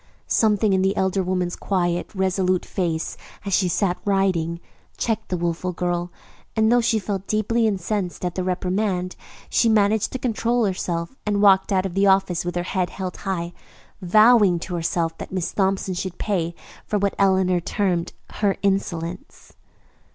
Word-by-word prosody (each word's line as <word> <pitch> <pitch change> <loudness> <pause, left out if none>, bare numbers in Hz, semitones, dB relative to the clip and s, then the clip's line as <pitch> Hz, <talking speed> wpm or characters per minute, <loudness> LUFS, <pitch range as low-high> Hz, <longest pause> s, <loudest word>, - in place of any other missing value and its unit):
Something 215 -2 +2
in 190 - +2
the 190 +1 +1
elder 190 0 +1
woman's 180 -1 -1
quiet, 175 -3 -1
resolute 185 -1 +1
face 165 -4 -2 0.3
as 200 - -2
she 185 0 +3
sat 180 0 0
writing 185 -5 +1 0.4
checked 225 -2 -2
the 180 - -1
wilful 175 +1 -2
girl, 175 0 -2 0.4
and 220 0 +3
though 245 0 +5
she 225 -1 +2
felt 195 -1 -3
deeply 220 +2 +1
incensed 195 -2 -2
at 175 - -2
the 185 - -2
reprimand, 185 0 -1 0.3
she 230 - +2
managed 215 0 +2
to - - -1
control 240 -1 0
herself 175 +1 -2
and 205 -1 0
walked 195 -1 +5
out 190 -1 +2
of 190 - -3
the 195 +1 +3
office 190 -3 +3
with 175 0 -4
her 175 - 0
head 180 0 -1
held 185 -2 -5
high, 175 -3 -3 0.5
vowing 215 0 +5
to 180 +2 -6
herself 165 -1 -1
that - - -7
Miss 185 -2 -2
Thompson 195 -1 0
should 180 0 -4
pay 170 -5 -1 0.3
for 210 - -1
what 200 0 0
Eleanor 190 -2 +3
termed 175 -1 -1 0.2
"her 200 -2 +1
insolence." 180 -3 -3
190 Hz, 165 wpm, -23 LUFS, 175-205 Hz, 0.5 s, though